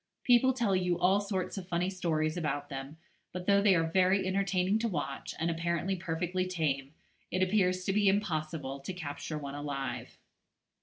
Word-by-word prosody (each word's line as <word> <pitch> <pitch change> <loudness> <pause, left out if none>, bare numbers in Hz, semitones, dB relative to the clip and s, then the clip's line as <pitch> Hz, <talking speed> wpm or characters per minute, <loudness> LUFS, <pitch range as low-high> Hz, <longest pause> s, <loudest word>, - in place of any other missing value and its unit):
People 245 +1 +5
tell 235 -6 +1
you 180 -2 +1
all 190 +3 +3
sorts 195 -1 -3
of 180 - -9
funny 180 +1 0
stories 160 -4 0
about 150 -4 -2
them; 135 +2 -6 0.3
but 180 0 -5
though 200 0 +5
they 200 -2 +5
are 165 - +3
very 185 +3 +3
entertaining 190 +1 +1
to 230 - 0
watch, 155 -9 -4
and 165 +2 0
apparently 170 +3 -1
perfectly 175 +2 -2
tame, 150 -5 -2 0.3
it 185 +1 +1
appears 185 -2 +2
to 195 - +1
be 205 0 +3
impossible 155 -8 -1
to 140 +7 -6
capture 145 -3 -5
one 140 -2 -6
alive. 145 -1 -4
180 Hz, 170 wpm, -31 LUFS, 155-190 Hz, 0.3 s, People